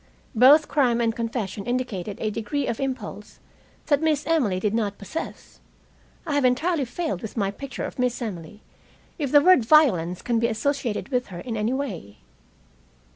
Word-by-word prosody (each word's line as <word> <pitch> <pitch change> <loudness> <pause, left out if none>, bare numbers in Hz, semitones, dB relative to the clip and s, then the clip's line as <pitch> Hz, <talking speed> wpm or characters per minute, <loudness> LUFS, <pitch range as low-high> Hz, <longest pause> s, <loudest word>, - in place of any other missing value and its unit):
Both 275 +6 +6
crime 250 -6 +2
and 230 -1 +1
confession 225 -3 -4
indicated 220 -6 -3
a 215 - -1
degree 230 +7 -2
of 230 - -3
impulse 220 -6 -5 0.5
that 290 -2 +2
Miss 310 -2 +1
Emily 255 - +1
did 210 +2 -1
not 210 -3 -1
possess. 265 +11 -7 0.7
I 305 - -2
have 285 -1 +2
entirely 280 +4 +1
failed 250 - -3
with 220 - -8
my 195 -2 0
picture 265 +5 -7
of - - -8
Miss 250 -1 0
Emily 210 -3 -7 0.6
if 285 -4 -2
the 290 - +7
word 365 -5 +6
violence 210 - +3
can 235 -2 +1
be 235 - +2
associated 240 0 -2
with 250 -2 -1
her 180 -3 -8
in 235 +1 -5
any 220 +3 0
way. 190 - -5
240 Hz, 170 wpm, -24 LUFS, 210-280 Hz, 0.7 s, the